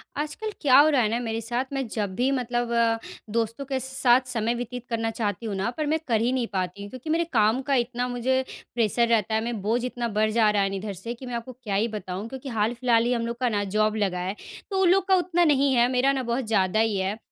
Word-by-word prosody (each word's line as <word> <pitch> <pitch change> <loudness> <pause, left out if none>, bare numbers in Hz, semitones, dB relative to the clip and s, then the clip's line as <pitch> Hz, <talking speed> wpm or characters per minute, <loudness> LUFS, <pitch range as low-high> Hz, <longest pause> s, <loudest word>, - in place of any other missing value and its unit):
आजकल 305 +9 -3
क्या 270 -4 +6
हो 300 +2 +6
रहा 280 -4 +3
है 215 - +1
ना 230 +2 0
मेरे 225 -1 -3
साथ 240 +3 -2
मैं 270 -1 -1
जब 210 -3 -3
भी 255 +2 +1
मतलब 240 -2 -1
अ, 230 -1 +2 0.3
दोस्तों 230 +4 -2
के 270 -1 -2
साथ 260 -1 +3
समय 235 -1 0
व्यतीत 245 0 -6
करना 225 -1 -1
चाहती 220 0 -3
हूँ 210 -3 -3
ना 195 +4 -1
पर 310 - -1
मैं 315 +2 +1
कर 225 -3 +2
ही 240 +2 +2
नहीं 255 -2 0
पाती 185 +1 -2
हूँ। 205 - -7
क्योंकि 255 +7 -8
मेरे 330 +2 +2
काम 220 +2 +3
का 275 +1 0
इतना 245 0 0
मुझे 250 +1 0 0.3
प्रेशर 235 0 +2
रहता 225 -1 +1
है, 220 - +1
मैं 230 -3 -3
बोझ 225 +5 0
इतना 245 -1 -3
बढ़ 215 0 +1
जा 220 -1 +4
रहा 205 -1 +2
है 195 - 0
ना 195 - -4
इधर 200 +1 -4
से 230 +6 -6
कि 245 +2 -11
मैं 245 - -6
आपको 235 +2 -6
क्या 205 -4 -2
ही 210 +4 +2
बताऊँ? 205 -2 -5
क्योंकि 265 +1 -7
हाल-फ़िलहाल 230 +1 +1
ही 245 - +2
हम 230 -1 -1
लोग 235 0 -4
का 250 -1 +1
ना 205 -2 0
जॉब 215 0 +2
लगा 195 -4 0
है 185 +3 -3 0.4
तो 385 -1 +1
उन 370 - +5
लोग 380 +1 +3
का 380 - +5
उतना 350 -1 +2
नहीं 280 -3 +3
है 240 0 +5
मेरा 260 +2 +3
ना 265 -1 -1
बहुत 240 +1 -1
ज़्यादा 205 -1 +2
ही 220 -3 +2
है। 190 +3 -1
235 Hz, 265 wpm, -25 LUFS, 215-260 Hz, 0.4 s, क्या